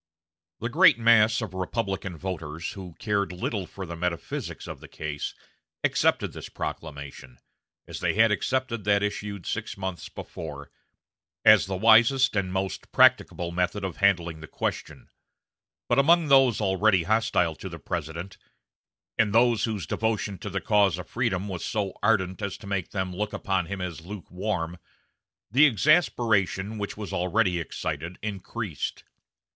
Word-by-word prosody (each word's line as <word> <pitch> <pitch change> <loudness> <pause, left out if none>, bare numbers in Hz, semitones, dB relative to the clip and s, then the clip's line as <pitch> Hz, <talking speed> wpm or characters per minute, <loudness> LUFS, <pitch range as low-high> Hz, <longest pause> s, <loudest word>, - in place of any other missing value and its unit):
The 115 - -1
great 165 +1 +6
mass 115 0 +5
of 100 -4 -6
Republican 95 -1 -3
voters, 85 -3 -5
who 90 -4 -9
cared 100 -3 -1
little 90 +1 -3
for 95 - -7
the 85 0 -6
"metaphysics" 85 -2 -4
of - - -7
the - - -12
case, 75 -1 -5 0.5
accepted - - +2
this - - -8
proclamation, 70 -5 -7 0.5
as - - -6
they - - 0
had 110 0 +5
accepted 120 +1 -1
that 100 0 +3
issued 100 -2 -4
six - - -4
months 95 -2 -5
before, - - -8 0.7
as - - +7
the 95 - -2
wisest 115 +5 +5
and 95 -2 0
most 95 0 -3
practicable 85 -1 +4
method 90 +3 -1
of 95 -3 -4
handling 85 -5 +2
the 80 - -9
question; - - -4 0.8
but - - +3
among 165 +2 +4
those 135 -4 +5
already 95 -2 +3
hostile 105 -4 +2
to 95 - -8
the 85 - -8
President, 85 +4 -5 0.8
and 110 -1 +3
those 120 -2 +4
whose 105 -7 -3
devotion 105 0 -1
to 100 - -5
the 95 0 -3
cause 100 -5 +3
of 90 - -7
freedom 105 -5 -1
was 90 -3 -5
so 100 -4 -2
ardent 95 -2 +1
as 100 -2 -3
to - - -13
make 100 -3 -2
them 95 -2 -3
look 105 +2 -3
upon 95 -3 -1
him 100 +1 -5
as 90 -3 -5
lukewarm, 90 -1 -4 0.7
the 140 +6 +7
exasperation 110 - +2
which 100 0 -4
was 105 -2 -6
already 90 0 +1
excited 85 +1 -4
increased. 105 -3 -4
100 Hz, 150 wpm, -26 LUFS, 90-110 Hz, 0.8 s, as